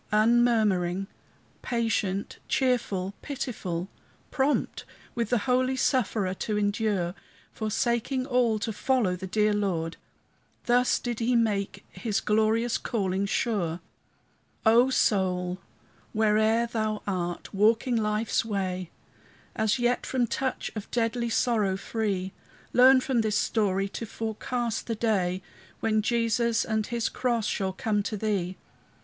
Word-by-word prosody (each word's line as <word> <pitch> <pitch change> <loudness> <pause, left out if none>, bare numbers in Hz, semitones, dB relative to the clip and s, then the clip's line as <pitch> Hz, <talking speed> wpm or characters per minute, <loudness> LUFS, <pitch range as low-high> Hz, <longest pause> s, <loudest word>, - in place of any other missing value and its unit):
Unmurmuring, 215 -5 +3 0.6
patient, 220 -5 -1
cheerful, 215 -7 0
pitiful, 210 - -4 0.4
Prompt 275 +2 0 0.3
with 235 -3 -2
the 245 - +3
holy 255 0 +2
sufferer 220 -8 +1
to 210 +2 -2
endure, 205 -3 0 0.4
Forsaking 235 +4 -1
all 245 -4 +2
to 220 +1 -3
follow 225 -5 +1
the 190 +1 -6
dear 210 +2 +2
Lord, 175 -6 -1 0.7
Thus 245 +1 +3
did 240 -2 -4
he 240 +1 +1
make 210 -4 0
his 205 +3 -2
glorious 220 +2 +1
calling 195 -3 -1
sure. 185 -7 -1 0.9
O 235 +4 +6
soul, 185 -6 +1 0.6
whoe'er 220 +2 +3
thou 215 -2 -2
art, 175 -2 -3
walking 225 +5 +3
life's 215 0 +1
way, 185 -5 -3 0.7
As 220 +1 +1
yet 245 0 0
from 255 -2 +1
touch 260 +3 -2
of 215 - -6
deadly 235 0 0
sorrow 215 -5 +1
free, 195 -3 -2 0.4
Learn 255 +1 +7
from 255 -3 +1
this 215 -1 +1
story 195 -3 +1
to 230 - -6
forecast 225 +1 -3
the 230 - -1
day 190 -5 0 0.4
When 215 -1 +1
Jesus 230 0 +1
and 220 -1 -1
his 235 0 -1
cross 235 -4 -1
shall 190 -3 -1
come 210 +2 0
to 210 +1 -3
thee. 190 -4 -1
220 Hz, 120 wpm, -27 LUFS, 195-235 Hz, 0.9 s, Learn